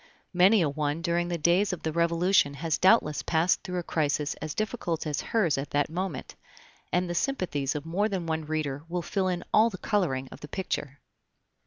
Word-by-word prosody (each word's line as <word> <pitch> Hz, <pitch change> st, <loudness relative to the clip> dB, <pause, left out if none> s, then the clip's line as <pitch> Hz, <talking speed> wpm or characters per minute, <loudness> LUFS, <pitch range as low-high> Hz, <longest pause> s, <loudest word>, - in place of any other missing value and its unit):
Many 185 Hz, +2 st, +5 dB
a -, -, +2 dB
one 150 Hz, +2 st, -2 dB
during 175 Hz, 0 st, 0 dB
the 175 Hz, -1 st, -2 dB
days 175 Hz, +6 st, +3 dB
of 180 Hz, -, -5 dB
the 160 Hz, -, -1 dB
Revolution 170 Hz, -2 st, +2 dB
has 160 Hz, +2 st, -1 dB
doubtless 185 Hz, -7 st, +4 dB
passed 165 Hz, +2 st, +1 dB
through 180 Hz, 0 st, -5 dB
a 175 Hz, -, -2 dB
crisis 150 Hz, -2 st, 0 dB
as 155 Hz, -1 st, -4 dB
difficult 215 Hz, -7 st, -2 dB
as 150 Hz, -2 st, -2 dB
hers 180 Hz, -12 st, +1 dB
at 140 Hz, -, -5 dB
that 145 Hz, +1 st, 0 dB
moment, 175 Hz, -5 st, -4 dB, 0.6 s
and 180 Hz, 0 st, +1 dB
the 175 Hz, -, -3 dB
sympathies 170 Hz, -, -1 dB
of 150 Hz, 0 st, -4 dB
more 195 Hz, +6 st, 0 dB
than 190 Hz, -4 st, -3 dB
one 160 Hz, -1 st, -2 dB
reader 150 Hz, -2 st, -3 dB
will 175 Hz, 0 st, -2 dB
fill 190 Hz, +1 st, -1 dB
in 180 Hz, -1 st, -2 dB
all 220 Hz, +2 st, +6 dB
the 190 Hz, -, -8 dB
coloring 160 Hz, -12 st, 0 dB
of -, -, -10 dB
the 150 Hz, -, -9 dB
picture. 145 Hz, -6 st, -4 dB
170 Hz, 200 wpm, -28 LUFS, 150-185 Hz, 0.6 s, all